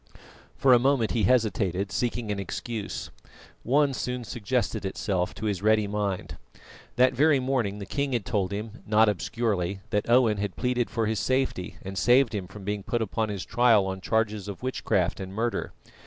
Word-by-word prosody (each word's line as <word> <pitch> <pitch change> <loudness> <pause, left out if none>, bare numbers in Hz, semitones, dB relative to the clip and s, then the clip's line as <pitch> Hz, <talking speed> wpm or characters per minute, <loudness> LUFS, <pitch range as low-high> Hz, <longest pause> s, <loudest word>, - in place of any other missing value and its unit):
For 130 -2 +5
a 120 - +7
moment 130 -3 +2
he 110 -4 +1
hesitated, 100 -5 +1
seeking 120 +1 -1
an 100 - -2
excuse. 105 +3 -5 0.5
One 140 +3 +2
soon 125 -1 -3
suggested 115 0 -2
itself 95 -1 -2
to 110 - -5
his 100 -4 -1
ready 110 0 +3
mind. 100 -2 -3 0.6
That 125 +1 +4
very 145 +2 +4
morning 125 -6 -1
the 100 - -6
king 140 +6 -2
had 115 -6 -1
told 100 -4 -1
him 105 +2 -6
not 110 +1 +5
obscurely 100 -2 -1
that 105 +2 0
Owen 120 -3 +4
had 100 -1 -3
pleaded 125 -1 0
for 115 -1 -1
his 110 -1 -1
safety 130 -8 -1
and 95 0 -4
saved 125 0 +4
him 95 -3 -3
from 95 +2 -11
being 105 +1 -2
put 120 +3 -1
upon 110 +1 -2
his 100 -3 -4
trial 120 -5 +4
on 95 0 -4
charges 110 -2 0
of 100 +4 -7
witchcraft 95 -8 0
and 95 0 -7
murder. 115 +2 -1
110 Hz, 180 wpm, -27 LUFS, 100-120 Hz, 0.6 s, a